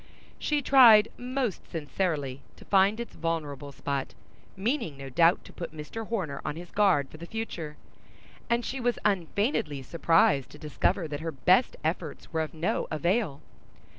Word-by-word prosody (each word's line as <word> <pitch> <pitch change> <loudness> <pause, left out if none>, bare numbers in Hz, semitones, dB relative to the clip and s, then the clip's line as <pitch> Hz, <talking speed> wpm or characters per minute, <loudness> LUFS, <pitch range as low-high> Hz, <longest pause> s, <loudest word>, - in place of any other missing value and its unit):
She 295 -1 0
tried 230 -6 +8
most 250 -4 -3
sincerely 145 -3 -2
to - - -15
find 200 +2 +3
its 235 - -6
vulnerable 150 -4 -3
spot, 140 +1 -4 0.4
meaning 215 - -1
no 135 0 -7
doubt 165 +6 +3
to - - -13
put 170 -2 -7
Mr. 210 +9 -6
Homer 175 -12 -3
on - - -3
his 175 +1 -9
guard 190 -10 +3
for - - -12
the 170 +2 -9
future; 170 -9 -5 0.7
and 235 0 +1
she 270 - -3
was 245 -1 0
unfeignedly 190 - 0
surprised 160 -3 +3
to - - -13
discover 155 +3 0
that 145 -1 -5
her 165 +1 -3
best 180 - +3
efforts 160 0 -4
were 160 - +1
of 155 0 -5
no 165 +2 -1
avail. 170 -1 0
170 Hz, 160 wpm, -28 LUFS, 150-215 Hz, 0.7 s, tried